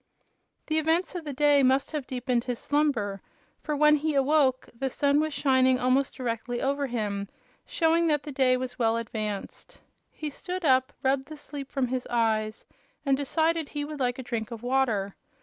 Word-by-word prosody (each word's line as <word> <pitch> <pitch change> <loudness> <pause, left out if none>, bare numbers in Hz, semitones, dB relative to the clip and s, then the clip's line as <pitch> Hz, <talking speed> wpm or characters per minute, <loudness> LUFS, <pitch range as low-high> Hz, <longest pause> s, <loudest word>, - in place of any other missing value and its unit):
The 315 0 +1
events 325 +3 +1
of 350 -3 -5
the 295 - -3
day 290 +1 +4
must 265 +1 +2
have 300 -4 -4
deepened 250 -1 -1
his 245 -2 -2
slumber, 230 -11 0 0.4
for 300 - -2
when 300 +1 +5
he 305 0 -1
awoke 275 -2 +3
the 265 +3 -2
sun 285 +2 +2
was 310 0 0
shining 260 -2 +3
almost 255 +2 +1
directly 240 -1 -3
over 280 +2 0
him, 205 -5 -3 0.4
showing 335 0 +2
that 295 -2 +1
the 295 - -6
day 260 -2 +3
was 255 0 -5
well 225 -1 +2
advanced. 215 -3 -5 0.3
He 305 -1 -6
stood 360 +4 -5
up, 260 0 +3
rubbed 270 +1 +1
the 310 0 -9
sleep 285 -2 -8
from 265 -3 0
his 255 0 -3
eyes 220 -2 0 0.4
and 275 -1 +3
decided 315 +3 0
he 290 -1 -3
would 300 -1 -7
like 250 0 0
a 260 - -6
drink 230 -3 -3
of 230 -1 -8
water. 240 -7 +1
265 Hz, 185 wpm, -27 LUFS, 245-295 Hz, 0.4 s, when